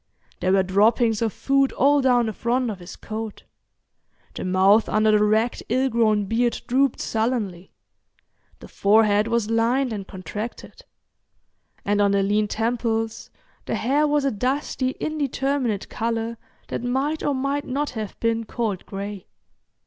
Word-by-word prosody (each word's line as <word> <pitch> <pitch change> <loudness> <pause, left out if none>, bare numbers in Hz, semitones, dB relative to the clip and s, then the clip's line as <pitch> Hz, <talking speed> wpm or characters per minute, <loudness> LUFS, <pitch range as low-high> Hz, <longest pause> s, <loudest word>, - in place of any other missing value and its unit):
There 185 +1 +1
were 195 -1 +4
droppings 215 +4 +2
of 225 -2 +1
food 275 +3 +1
all 285 +1 +3
down 250 -2 +3
the 220 - -3
front 240 +2 0
of 195 - -8
his 175 +1 -10
coat; 220 -1 -6 0.9
the - - -5
mouth 190 +4 +4
under 215 0 +3
the 210 0 +4
ragged 220 +3 +1
ill 260 +3 +2
grown 215 -3 +2
beard 235 +4 0
drooped 265 +1 +1
sullenly; 220 -6 -2 0.9
the - - -10
forehead 210 +1 +3
was 230 -2 0
lined 235 +2 +1
and 200 -2 -6
contracted; 210 - -7 1.0
and 205 0 +2
on 200 -1 +3
the 200 0 +2
lean 210 +2 +1
temples 225 0 -2 0.4
the - - -1
hair 290 +4 +2
was 295 -1 +1
a 275 - +2
dusty 260 +3 -1
indeterminate 275 -7 -1
colour 230 0 -3 0.3
that - - -3
might 270 +5 -1
or 285 - 0
might 275 +2 -1
not 285 +3 -2
have 220 -4 -6
been 230 0 0
called 215 -5 -3
gray. 200 -1 -6
225 Hz, 150 wpm, -23 LUFS, 210-260 Hz, 1.0 s, were